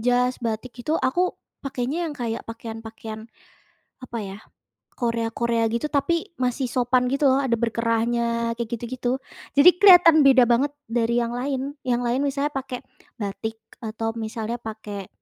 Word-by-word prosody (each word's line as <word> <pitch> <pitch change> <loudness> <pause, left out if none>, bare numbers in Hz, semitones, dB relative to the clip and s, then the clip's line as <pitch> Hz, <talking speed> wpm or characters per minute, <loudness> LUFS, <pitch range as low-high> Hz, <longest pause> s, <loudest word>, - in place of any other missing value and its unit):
jas, 250 +1 +3
batik 230 +2 -3
itu 305 - -2
aku 260 +5 0 0.4
pakainya 260 +2 -2
yang 295 - -6
kayak 230 -2 -3
pakaian-pakaian 225 -1 -7 0.8
apa 240 -2 -6
ya, 195 0 -7 0.6
Korea 230 -2 -1
Korea 235 -1 +1
gitu 235 +6 0
tapi 290 +3 +1 0.2
masih 255 +1 0
sopan 250 0 +3
gitu 275 +2 0
loh, 265 +1 +3
ada 245 -4 +1
berkerahnya 230 0 0
kayak 230 -1 -5
gitu-gitu. 245 +2 -2 0.4
Jadi 290 +6 +10
kelihatan 350 -5 +8
beda 265 -3 +6
banget 245 +5 +3 0.2
dari 235 +1 +1
yang 235 0 -3
lain. 270 +2 -2
Yang 245 -2 0
lain 240 +3 +1
misalnya 285 +1 0
pake 260 -2 -5 0.3
batik 220 +2 -4 0.2
atau 225 0 -3
misalnya 225 +1 -4
pake 210 -3 -7
240 Hz, 145 wpm, -24 LUFS, 230-260 Hz, 0.8 s, Jadi